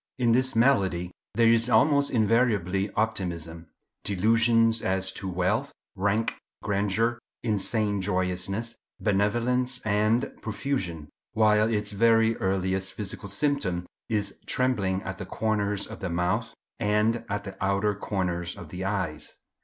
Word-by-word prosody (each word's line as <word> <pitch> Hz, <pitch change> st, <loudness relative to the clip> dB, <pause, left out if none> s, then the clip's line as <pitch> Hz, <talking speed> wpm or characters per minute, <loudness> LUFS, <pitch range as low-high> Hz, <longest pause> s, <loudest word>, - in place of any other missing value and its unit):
"In 120 Hz, -2 st, +2 dB
this 130 Hz, +1 st, +2 dB
malady 95 Hz, -8 st, +2 dB, 0.2 s
there 115 Hz, +1 st, +4 dB
is 115 Hz, +1 st, +4 dB
almost 140 Hz, +4 st, +4 dB
invariably 105 Hz, -5 st, +2 dB
optimism—delusions 110 Hz, +4 st, 0 dB
as 95 Hz, 0 st, +1 dB
to 95 Hz, 0 st, -6 dB
wealth, 95 Hz, +10 st, 0 dB, 0.2 s
rank, 100 Hz, +3 st, 0 dB, 0.3 s
grandeur—insane 105 Hz, 0 st, 0 dB
joyousness, 95 Hz, +4 st, -1 dB, 0.2 s
benevolence, 120 Hz, +5 st, +1 dB
and 110 Hz, +4 st, +2 dB
profusion, 95 Hz, -, -3 dB, 0.2 s
while 110 Hz, 0 st, +3 dB
its 105 Hz, -1 st, 0 dB
very 115 Hz, +2 st, +4 dB
earliest 95 Hz, 0 st, -1 dB
physical 100 Hz, -1 st, -7 dB
symptom 100 Hz, -7 st, 0 dB, 0.2 s
is 105 Hz, -3 st, -2 dB
trembling 100 Hz, -7 st, +1 dB
at 95 Hz, 0 st, -6 dB
the -, -, -5 dB
corners 105 Hz, -2 st, -1 dB
of 110 Hz, -, -9 dB
the 95 Hz, -, -3 dB
mouth 90 Hz, +7 st, -1 dB, 0.3 s
and 105 Hz, +2 st, +1 dB
at 100 Hz, 0 st, -2 dB
the 100 Hz, -2 st, -8 dB
outer 100 Hz, +2 st, +1 dB
corners 90 Hz, -4 st, -3 dB
of 80 Hz, -, -10 dB
the 90 Hz, +3 st, -6 dB
eyes. 95 Hz, -6 st, -3 dB
105 Hz, 120 wpm, -27 LUFS, 95-115 Hz, 0.3 s, there